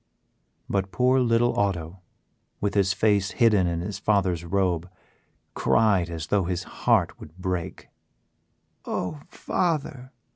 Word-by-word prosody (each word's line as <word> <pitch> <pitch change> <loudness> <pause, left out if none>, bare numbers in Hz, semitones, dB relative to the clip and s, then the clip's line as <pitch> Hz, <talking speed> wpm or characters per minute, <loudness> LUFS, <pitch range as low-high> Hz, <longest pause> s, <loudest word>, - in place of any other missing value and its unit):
But 95 -1 -1
poor 125 +7 +3
little 120 -2 +2
Otto, 95 -3 -1 0.6
with 100 - -1
his 100 -2 +2
face 100 -1 +1
hidden 105 -6 +3
in 85 -1 -2
his 100 +2 -5
father's 95 -6 +1
robe, 90 -1 0 0.6
cried 100 -6 +2
as 80 -2 -5
though 95 +3 +1
his 90 -1 -2
heart - - 0
would 80 +4 -13
break. 90 -2 -4 1.0
"Oh, 140 +11 -4
father!" 145 -6 -2
95 Hz, 120 wpm, -25 LUFS, 90-110 Hz, 1.0 s, poor